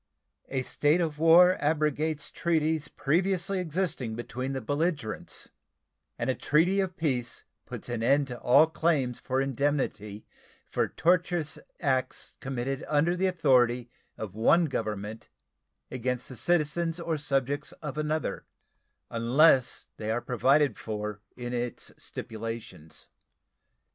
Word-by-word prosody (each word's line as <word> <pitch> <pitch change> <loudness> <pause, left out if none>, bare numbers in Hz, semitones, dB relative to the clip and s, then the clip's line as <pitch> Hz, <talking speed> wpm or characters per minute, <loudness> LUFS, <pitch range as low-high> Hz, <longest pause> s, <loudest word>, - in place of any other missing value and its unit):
A 135 -1 -1
state 150 +6 +2
of 155 -4 -1
war 175 +3 +7
abrogates 150 0 0
treaties 160 -3 0
previously 185 +5 0
existing 160 -9 -2
between 125 +3 -4
the 135 - -2
belligerents 145 -3 -2 0.7
and 120 - -2
a 130 - +2
treaty 170 +9 +2
of 185 -2 -1
peace 130 -7 -2 0.2
puts - - -7
an 120 -2 -3
end 140 +5 +3
to 125 - -6
all 140 +5 +6
claims 155 -6 0
for 130 0 -1
indemnity 135 -6 -1 0.4
for - - 0
tortious 175 -2 +1 0.2
acts 130 -2 -1
committed 135 0 -3
under 155 +4 +2
the 190 +1 +1
authority 125 -8 +2 0.3
of 105 -4 -6
one 165 - +4
government 110 -5 -4 0.6
against 125 0 -2
the 130 - -8
citizens 165 +3 0
or 170 -1 -1
subjects 140 0 -1
of 150 -2 -7
another 155 +1 -2 0.6
unless 130 +3 +3
they 110 - -4
are 115 +2 +1
provided 130 +1 +2
for 105 -1 -4 0.2
in 120 0 -5
its 120 -1 -3
stipulations. 110 -8 -7
140 Hz, 125 wpm, -28 LUFS, 120-160 Hz, 0.7 s, war